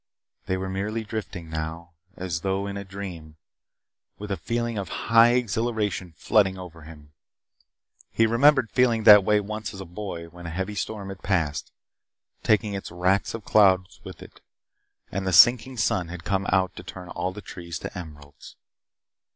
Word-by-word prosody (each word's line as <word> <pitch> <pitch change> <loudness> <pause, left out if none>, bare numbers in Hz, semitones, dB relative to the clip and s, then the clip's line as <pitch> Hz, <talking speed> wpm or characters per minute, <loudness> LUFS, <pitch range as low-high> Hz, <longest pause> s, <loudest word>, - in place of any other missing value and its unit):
They 95 - 0
were 95 0 -4
merely 105 +4 -3
drifting 105 -6 -6
now, 80 +2 -5 0.3
as 90 -3 -3
though 95 +1 -1
in 100 0 -5
a 100 - -5
dream, 95 -6 -8 0.8
with 105 0 -7
a - - +1
feeling 115 +1 -2
of 95 - -5
high 115 +1 +4
exhilaration 110 -7 -1
flooding 95 -3 +2
over 85 -3 -10
him. 75 -1 -14 1.0
He 115 - +2
remembered 130 +1 +4
feeling 120 -3 +2
that 105 -2 +9
way 105 +1 +3
once 105 0 -5
as - - -9
a 95 - -6
boy 90 -1 -6
when 85 +1 -10
a - - -4
heavy 95 +5 -3
storm 100 0 -4
had 95 -1 -9
passed, 85 -7 -1 0.7
taking 105 -1 +2
its 100 - -5
wracks 90 +5 0
of 115 - -8
clouds 95 -3 +3
with - - -10
it, - - -16 0.7
and 95 0 -3
the - - +1
sinking 125 +7 +6
sun 95 -6 0
had 85 0 -8
come 95 +1 -1
out 95 -1 +1
to - - -8
turn 90 -1 -9
all 90 - -3
the 100 - -9
trees 85 -3 -7
to - - -8
emeralds. 75 -5 -11
95 Hz, 170 wpm, -25 LUFS, 90-105 Hz, 1.0 s, that